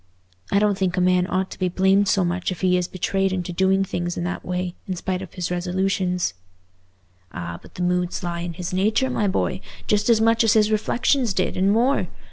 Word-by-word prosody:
I - - +3
don't 205 -1 +2
think 185 -1 0
a - - +3
man 180 0 +3
ought 185 +1 -1
to - - -9
be 185 -1 +1
blamed 190 +2 +3
so 190 -1 +2
much 175 +2 -1
if 180 - -6
he 185 -1 +3
is 180 -1 0
betrayed 195 +1 -1
into 180 -1 -3
doing 190 +2 +2
things 175 -2 -3
in 175 - -2
that 175 0 -3
way, 180 -1 -3
in 185 - -2
spite 185 +1 -3
of 190 - -10
his 180 -2 -3
resolutions." 180 - 0 1.0
"Ah, 85 0 -6
but - - -17
the 180 - -3
moods 180 0 0
lie 170 -1 -3
in 170 0 -4
his 175 +1 -5
nature, 215 +8 +1
my 210 -4 0
boy, 190 -1 -1 0.2
just 210 +2 +1
as 230 -2 +5
much 225 +1 +3
as 225 -1 +4
his 215 -1 +3
reflections 235 +1 +1
did, 185 - 0
and 190 +2 +2
more. 245 +6 +2
185 Hz, 220 wpm, -23 LUFS, 180-200 Hz, 1.0 s, as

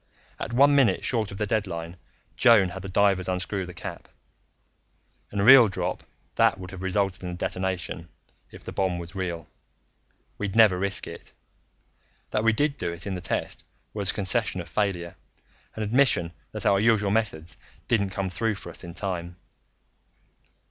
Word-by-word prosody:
"At - - -4
one 140 +4 +5
minute 135 -4 +3
short 110 -5 0
of 100 - -8
the 105 - 0
deadline, 90 -6 -2 0.4
Joan 115 -7 +5
had 95 +2 -7
the 95 - -7
divers 95 -1 +2
unscrew 95 +1 -2
the 90 - -8
cap. - - -8 1.2
In 100 - -3
a - - +2
real 125 0 +9
drop 95 - -3 0.3
that - - +3
would 90 -1 -8
have 95 -1 -8
resulted 95 0 -1
in 90 - -5
a - - -5
detonation, 90 -2 -3 0.4
if - - -13
the - - -7
bomb 95 -2 0
was 85 0 -8
real; 85 -4 -4 0.9
we'd 105 -1 -3
never 105 -5 +6
risk 95 -1 -1
it. - - -11 1.0
That 105 - 0
we 115 - +5
did 145 +5 0
do 85 - -1
it 85 +1 -6
in 100 - -3
the 90 - -4
test 90 - -3 0.3
was 100 -2 0
a - - +2
concession 105 0 0
of 85 - -6
failure 90 -5 -2 0.6
an 110 - -3
admission 105 -7 +2 0.2
that - - -6
our 100 - +4
usual 105 -2 +3
methods 85 -8 -1 0.3
didn't 100 -4 +2
come 95 0 -3
through 110 +3 -1
for 100 - -9
us - - -8
in 85 -1 -9
time. 90 -3 -4
95 Hz, 175 wpm, -26 LUFS, 90-110 Hz, 1.2 s, real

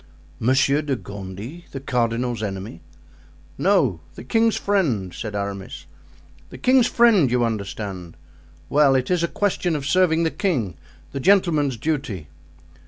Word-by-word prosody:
"Monsieur 135 +4 +3
de 145 -3 -1
Gondy! 100 - -8
the 135 - -4
cardinal's 120 -2 -1
enemy?" 95 -3 -5 0.7
"No; 160 - +2 0.2
the - - -9
king's 225 - +2
friend," 135 - 0
said 105 -2 -6
Aramis; 100 -1 -5 0.6
"the - - -10
king's 255 -1 +4
friend, 225 - +4
you 120 0 +2
understand. 100 -5 -5 0.5
Well, 140 -2 +4
it 130 +3 0
is 180 -2 +2
a 170 - +1
question 180 -3 -1
of 140 -2 -4
serving 170 +1 +3
the 160 - +1
king, 135 - -1 0.4
the 135 - -4
gentleman's 155 - +3
duty." 115 - -3
135 Hz, 135 wpm, -22 LUFS, 105-170 Hz, 0.7 s, king's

